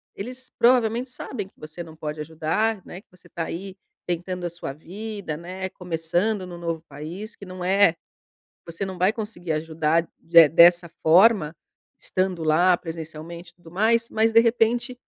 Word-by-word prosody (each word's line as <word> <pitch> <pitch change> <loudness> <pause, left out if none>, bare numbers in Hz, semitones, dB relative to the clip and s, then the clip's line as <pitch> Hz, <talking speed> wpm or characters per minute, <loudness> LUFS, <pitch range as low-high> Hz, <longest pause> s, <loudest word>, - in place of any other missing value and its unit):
eles 255 +5 -6
provavelmente 240 0 +3
sabem 215 -5 -6
que - - -33
você 155 +3 -8
não 160 -1 -13
pode 155 -1 -6
ajudar, 165 +7 -1
né, 180 - -9
que - - -45
você 180 -1 -20
tá 165 -1 -4
aí 190 +4 -7 0.3
tentando 180 +1 -3
a - - -1
sua 170 -5 -6
vida, 195 +2 -6
né, 185 +3 -6
começando 180 +4 -1
no 175 -1 -8
novo 165 -2 -3
país, 170 +10 -8
que 200 - -11
não 185 -1 -8
é 190 -1 +4 0.7
você 170 +4 -5
não 190 -1 -6
vai 185 +3 +3
conseguir 210 -7 -5
ajudar 160 +1 0
de 165 -1 +7
dessa 170 +2 +6
forma, 175 -1 +5 0.5
estando 185 -3 -1
lá 175 +3 +4
presencialmente 165 +1 -8
e - - -45
tudo 175 -2 -16
mais, 230 +5 +2
mas 220 +1 +2
de 230 - +8
repente, 240 +2 +1
180 Hz, 165 wpm, -24 LUFS, 165-210 Hz, 0.7 s, de